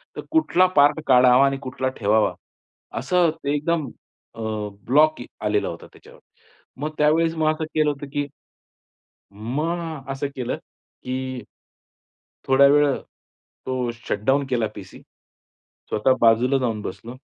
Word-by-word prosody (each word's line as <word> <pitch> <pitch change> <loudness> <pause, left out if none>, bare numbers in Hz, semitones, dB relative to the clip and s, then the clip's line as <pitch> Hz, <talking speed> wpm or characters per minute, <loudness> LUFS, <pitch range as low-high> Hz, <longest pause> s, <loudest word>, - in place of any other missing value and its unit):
तर - - -5
कुठला 250 - +3
पार्ट 145 +2 +5
काढावा 125 +1 +6
आणि 135 0 0
कुठला 130 0 -3
ठेवावा. 105 +1 +2 0.7
असं 180 -2 +2
ते 140 - 0
एकदम 155 0 0 0.5
अ, 115 - -8 0.4
ब्लॉक 150 +2 +3 0.2
आलेला 105 -1 +1
होता 85 - -9
त्याच्यावर. - - -17 0.6
मग 150 - -1
त्यावेळेस 160 +2 +3
मग 155 -1 +2
असं 160 0 -4
केलं 155 -1 +3
होतं, 145 0 -8
की 145 0 -1 1.1
मग 150 +7 -4
असं 135 +1 -3
केलं, 125 -2 -2 0.5
की 130 -1 -4 1.0
थोड्यावेळ 140 +1 +5 0.7
तो 130 -2 -1
शटडाउन 120 +4 -1
केला 115 -3 +1
पीसी. - - -11 0.9
स्वतः 130 +5 +3
बाजूला 120 +4 +4
जाऊन 115 -5 -1
बसलो. 115 +3 -7
135 Hz, 120 wpm, -23 LUFS, 125-150 Hz, 1.1 s, काढावा